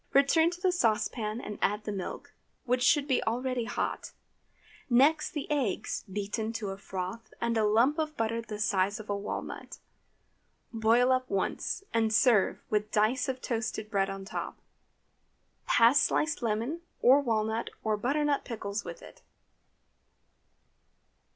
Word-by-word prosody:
Return 300 +4 +5
to 350 0 -8
the 370 0 +2
saucepan 225 -6 0
and 210 -4 -7
add 210 +1 +1
the 210 - -4
milk, 195 -3 -6 0.3
which 250 0 0
should 290 +2 +4
be 265 - +2
already 245 +1 -1
hot. - - -3 0.8
Next 285 +6 +4
the 295 -3 -4
eggs, 265 -10 -1
beaten 210 +3 -3
to 215 -4 -3
a 195 - -6
froth, 195 +4 -6
and 235 0 0
a 220 - +2
lump 235 +9 +3
of 305 -1 -2
butter 230 +1 -1
the 220 -2 -7
size 205 -1 +1
of 215 -1 -6
a - - 0
walnut. 200 +1 -6 1.0
Boil 230 +3 +3
up 255 0 +1
once, 195 - -2
and 225 -1 +2
serve 220 -2 +3
with 210 0 0
dice 230 +6 +2
of 260 -1 -4
toasted 220 -2 -3
bread 195 -1 +1
on 195 0 -6
the 195 - -11
top. - - -4 1.1
Pass 235 +5 +5
sliced 305 -2 +1
lemon, 235 +8 -1 0.2
or 265 +4 +6
walnut 225 -2 -1
or 215 -1 +1
butternut 285 +6 0
pickles 210 -3 -4
with - - -8
it. - - -14
230 Hz, 150 wpm, -29 LUFS, 210-265 Hz, 1.1 s, or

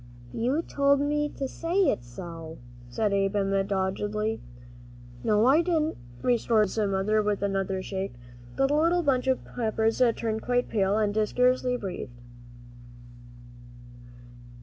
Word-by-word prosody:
"You 260 +8 0
told 280 -2 +2
me 295 +1 0
to 275 - -4
say 330 +6 -4 0.2
it 120 - -4
so," 165 +5 -9 0.3
said 200 - 0
Ab'm, 195 0 +1 0.2
doggedly. 205 +3 -1 0.8
"No, 215 +1 +3
I 280 +6 +5
didn't," 320 -3 0 0.3
retorted 230 -4 +2
his 215 -2 0
mother 200 +3 +1
with 205 -1 -1
another 195 -1 -1
shake. 190 -7 -4 0.4
The 270 - +2
little 330 +5 +2
bunch 265 -3 +1
of 260 -1 +1
Peppers 225 0 -1
turned 220 -1 -2
quite 245 0 0
pale, 200 -1 +1
and 210 -1 0
scarcely 250 0 +2
breathed. 180 - -7
220 Hz, 125 wpm, -27 LUFS, 195-260 Hz, 0.8 s, I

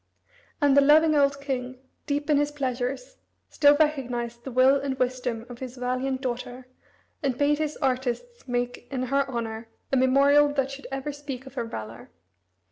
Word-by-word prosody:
And 285 -3 +4
the 280 - +7
loving 310 +2 +5
old 280 -1 +3
king, 255 -2 -4 0.3
deep 290 0 -1
in 295 - +5
his 290 0 +1
pleasures, 270 - -3 0.3
still 290 -1 +5
recognized 245 -6 -1
the 265 - -6
will 260 +3 +5
and 275 -1 -3
wisdom 250 -3 -2
of 245 -1 -10
his 255 -1 -7
valiant 255 +1 -2
daughter, 250 0 -5 0.6
and 270 -4 -1
bade 290 +1 +2
his 305 -1 -2
artists 265 - -2
make 245 0 -3
in 260 -2 -2
her 275 +2 0
honor 225 -2 -4 0.2
a - - +3
memorial 280 +3 +5
that 270 -1 0
should 275 +1 -8
ever 270 +2 -3
speak 280 -3 -7
of 265 - -11
her 235 - -3
valor. 115 - -8
265 Hz, 170 wpm, -26 LUFS, 250-285 Hz, 0.6 s, the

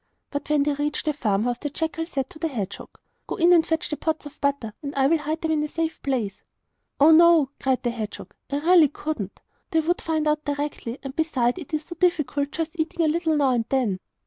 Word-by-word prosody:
But 285 +1 -4
when 300 -2 +3
they 295 0 +1
reached 290 +1 -2
the 305 - +1
farmhouse 240 -1 0
the 290 - -3
jackal 320 +2 -3
said 270 -5 -2
to 310 - -13
the 325 - 0
hedgehog: 210 -9 -5 0.4
'Go - - -3
in 350 +1 +5
and 335 -2 +6
fetch 320 -1 -1
the 300 - -2
pots 315 +1 -2
of 290 0 -11
butter 280 -7 -1
and 285 -1 -6
I 270 -1 +3
will 325 +3 +3
hide 310 +2 -3
them 320 - 0
in 310 -1 +2
a 300 - -1
safe 325 +1 -3
place.' 235 -8 -2 0.6
'Oh 295 +3 +7
no,' 325 -3 +6
cried 265 -1 0
the 240 - +1
hedgehog, 220 -3 -6 0.2
'I 285 +1 -1
really 340 -1 +6
couldn't. 285 -9 -5 0.3
They 325 - +2
would 345 +3 0
find 315 -1 0
out 300 0 +1
directly! 285 -4 -3
And, 270 0 -6
besides, 260 -5 +1
it 310 - -10
is 310 -1 -2
so 345 - -8
different 290 -5 +1
just 325 +1 -4
eating 325 +1 0
a - - +3
little 320 0 +1
now 275 -3 +3
and 235 -2 +1
then. 240 -9 +1
295 Hz, 230 wpm, -24 LUFS, 265-320 Hz, 0.6 s, Oh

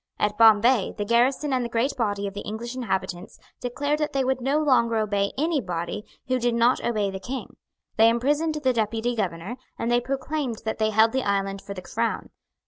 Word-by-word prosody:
At 210 0 0
Bombay, 225 +1 +5
the 205 - -2
garrison 255 +6 +2
and 255 -1 +1
the 235 - -3
great 235 +5 0
body 205 -4 -1
of 200 - -4
the 205 - -5
English 235 +3 -6
inhabitants 190 -6 -3 0.2
declared 285 +5 -1
that 300 - -1
they 270 -1 +1
would 260 0 0
no 275 +4 +1
longer 250 -7 +3
obey 205 -2 0
any 310 0 +1
body 175 +1 -4 0.2
who 255 0 +1
did 240 -1 +1
not 235 +2 +3
obey 210 -4 0
the 190 - -5
King; 250 +7 -6 0.4
they 225 +1 +7
imprisoned 290 +7 +1
the 265 -4 +1
Deputy 225 +1 -1
Governor; 195 +2 -3 0.2
and 230 - -1
they 240 0 +3
proclaimed 265 -1 -3
that 220 - -2
they 215 0 +2
held 220 +1 +4
the 265 - 0
island 195 -2 -1
for 200 - -8
the 185 - -8
Crown. 230 +3 -2
230 Hz, 205 wpm, -25 LUFS, 205-260 Hz, 0.4 s, they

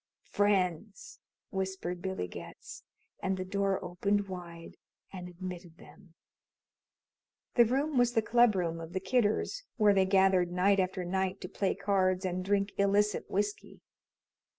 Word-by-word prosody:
"Friends," 200 -1 0 0.3
whispered 190 -2 -3
Billy 190 - -3
Getz, 85 -1 -10 0.4
and 190 0 -1
the 185 - -4
door 195 0 0
opened 200 +3 0
wide 170 -2 -9 0.4
and 180 -1 -7
admitted 175 -2 -8
them. 175 -4 -17 1.4
The 240 - +6
room 270 +4 0
was 245 0 +3
the 225 - +2
club 235 -2 +4
room 165 -3 -1
of 165 +1 -9
the 190 - 0
Kidders, 245 - 0
where 210 -3 +5
they 190 -1 +3
gathered 190 -2 +3
night 195 +2 +3
after 185 0 -1
night 190 +1 -1
to - - -5
play 195 - -1
cards 190 -2 +1
and 185 0 -2
drink 200 +1 +1
illicit 200 +1 +2
whiskey. 205 +1 -3
190 Hz, 140 wpm, -31 LUFS, 180-205 Hz, 1.4 s, The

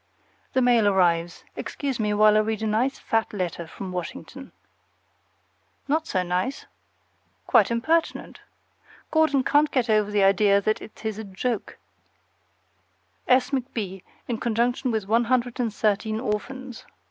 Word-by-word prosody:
The 260 - +3
mail 240 -4 +4
arrives. 175 -3 +1
Excuse 275 -4 -4
me 210 -1 0
while 215 0 +5
I - - +5
read 220 0 -1
a - - 0
nice 230 +6 0
fat 225 0 -1
letter 175 -4 -3
from 185 +3 -7
Washington. 180 +9 -7 1.4
Not 315 +3 0
so 185 -2 0
nice; 180 +9 -2 0.8
quite - - +4
impertinent. 315 +8 -1 0.7
Gordon 315 -4 +3
can't 295 +2 +3
get 245 -4 0
over 210 -1 +2
the 205 -1 +2
idea 200 +1 +4
that 215 +2 -1
it 220 - -12
is 220 -1 -3
a - - -5
joke, 215 +3 -4 1.5
S. 255 +2 +3
McB. 225 -8 -3 0.3
in 235 -3 -2
conjunction 240 +3 0
with 220 -4 -2
one 230 +3 +3
hundred 245 0 0
and 235 -3 0
thirteen 215 +1 0
orphans. 250 +2 -4
220 Hz, 140 wpm, -25 LUFS, 205-255 Hz, 1.5 s, while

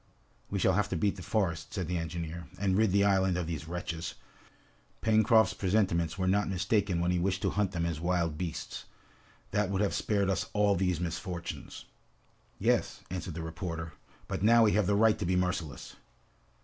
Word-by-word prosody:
"We 100 - -2
shall 95 0 +3
have 105 +1 +1
to 95 - -2
beat 100 +4 +1
the - - -7
forest," 90 -4 -1
said 95 -5 -2
the 90 0 -1
engineer, 85 0 -5
"and 95 -2 +1
rid 110 -1 +3
the 100 +1 +4
island 95 -2 +3
of 90 - -1
these 80 -2 -5
wretches. 85 -1 -4 0.9
Pencroft's 110 -3 +4
presentiments 90 -4 +1
were 95 - -1
not 100 +2 +2
mistaken, 95 0 +1
when 90 +1 +1
he 90 - +1
wished 95 +1 -1
to - - +2
hunt 100 -2 0
them 85 -2 -1
as 85 -3 -2
wild 85 -2 0
beasts. 80 -1 -5 0.7
That 105 -2 +1
would 95 0 0
have 100 - +1
spared 100 -2 +1
us 95 0 -1
all 105 -1 +3
these 90 -2 0
misfortunes!" 85 0 -5 0.7
"Yes," - - +1
answered 90 -2 -4
the 85 - -4
reporter, 80 0 -5 0.3
"but - - -3
now 115 +2 +6
we 105 - +5
have 105 -2 +2
the 100 - +3
right 110 +1 +4
to - - -1
be 90 - +2
merciless!" 90 - -2
90 Hz, 190 wpm, -30 LUFS, 85-100 Hz, 0.9 s, now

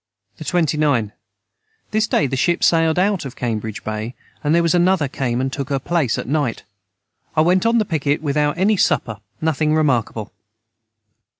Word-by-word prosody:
the - - -8
29. 150 - +1 0.8
This 215 0 +1
day 150 - +2
the 135 0 -2
Ship 175 +6 +1
sailed 165 -1 +3
out 195 0 +1
of 135 -3 -7
cambridge 110 -3 -4
Bay 110 +3 -4 0.3
and 150 +2 +2
their 170 - +3
was 165 - +2
another 175 -3 +3
came 130 -3 -2
and 130 +1 -2
took 140 -1 -4
her 140 - +1
place 140 -2 0
at - - -5
night 145 -4 -1 0.7
I 155 - +4
went 180 +6 +3
on 235 +1 +3
the 220 - +2
piquet 150 -4 0
without 150 0 0
any 200 +3 +2
supper 115 - 0 0.2
nothing 155 -1 +1
remarkable. 120 -8 0
150 Hz, 170 wpm, -20 LUFS, 130-170 Hz, 0.8 s, I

